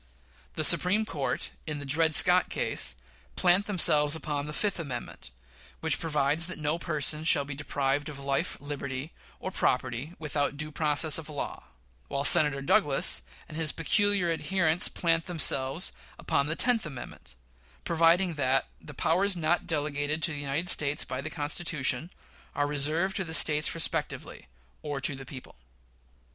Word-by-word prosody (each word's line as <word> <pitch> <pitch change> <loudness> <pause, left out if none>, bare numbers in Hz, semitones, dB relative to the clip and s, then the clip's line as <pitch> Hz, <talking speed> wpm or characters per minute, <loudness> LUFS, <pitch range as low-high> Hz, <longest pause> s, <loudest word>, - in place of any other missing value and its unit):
The - - -2
Supreme 205 +5 +5
Court, 145 -10 -4 0.2
in 150 -1 -4
the 145 - -7
Dred 160 +3 +2
Scott 180 0 +5
case, - - -1 0.4
plant 185 +2 +2
themselves 150 -6 +4
upon 150 -2 -5
the - - -6
fifth 200 +4 -2
amendment, 130 -7 -8 0.5
which 160 -4 +1
provides 150 +1 0
that 185 - -6
no 155 +2 -2
person 155 -1 -2
shall 155 -3 +3
be 140 - -7
deprived 140 +1 -2
of 145 - -9
"life, 140 +5 -3
liberty, 140 0 -6 0.3
or 185 - -6
property 130 +2 -2
without 145 -2 -3
due 155 +1 -5
process 155 +1 +3
of 160 -1 -10
law"; 145 -2 -7 0.4
while 140 - -3
Senator 145 -3 +6
Douglas 140 - +2 0.3
and - - -11
his 160 -1 +3
peculiar 200 +1 +1
adherents 170 0 +2
plant 165 -1 -1
themselves 155 -2 +1 0.3
upon 140 - -1
the 155 - -2
tenth 240 +1 +2
amendment, 125 - -10 0.5
providing 170 +2 +2
that 135 -3 0 0.2
"the 150 - -12
powers 185 +7 0
not 170 +1 -1
delegated 150 0 -2
to 170 - +3
the 145 - -6
United 145 +5 -3
States 150 -2 +2
by 130 0 -5
the 155 - -6
Constitution" 150 -2 -1 0.5
"are 145 - 0
reserved 155 +6 -1
to 190 - -1
the 160 -2 -3
States 150 -1 +3
respectively, 165 - -1 0.3
or 145 -2 -5
to 140 - 0
the 135 -1 -10
people." 130 -2 -11
150 Hz, 155 wpm, -27 LUFS, 140-165 Hz, 0.5 s, Senator